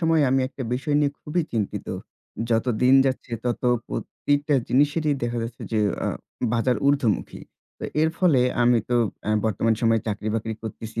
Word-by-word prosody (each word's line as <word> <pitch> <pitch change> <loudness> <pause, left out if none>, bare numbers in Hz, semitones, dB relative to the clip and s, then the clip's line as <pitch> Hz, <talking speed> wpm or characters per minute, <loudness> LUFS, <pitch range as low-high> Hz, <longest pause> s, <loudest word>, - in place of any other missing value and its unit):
সময়ে 165 -2 +3
আমি 135 0 +3
একটা 135 - -7
বিষয় 145 +3 0
নিয়ে 145 -1 +1
খুবই 170 +3 -1
চিন্তিত। 105 -4 -2 0.6
যত 115 +1 +2 0.2
দিন 130 +1 +6
যাচ্ছে 130 -2 -3
ততো 125 0 0 0.2
প্রতিটা 145 +1 -1
জিনিসেরই 145 +3 +2
দেখা 120 0 -1
যাচ্ছে 115 +1 -7
যে 110 - +2 0.3
আ - - +1 0.4
বাজার 120 0 +2
ঊর্ধ্বমুখী। 140 -7 +1 0.4
তো - - -6 0.2
এর 160 - +3
ফলে 165 -9 +4 0.2
আমি 120 0 +5
তো 120 - +3 0.3
অ্যা - - -1
বর্তমান 110 +1 +1
সময়ে 115 -1 +3
চাকরি-বাকরি 110 +1 -2
করতেছি। 110 0 -6
125 Hz, 160 wpm, -24 LUFS, 115-145 Hz, 0.6 s, দিন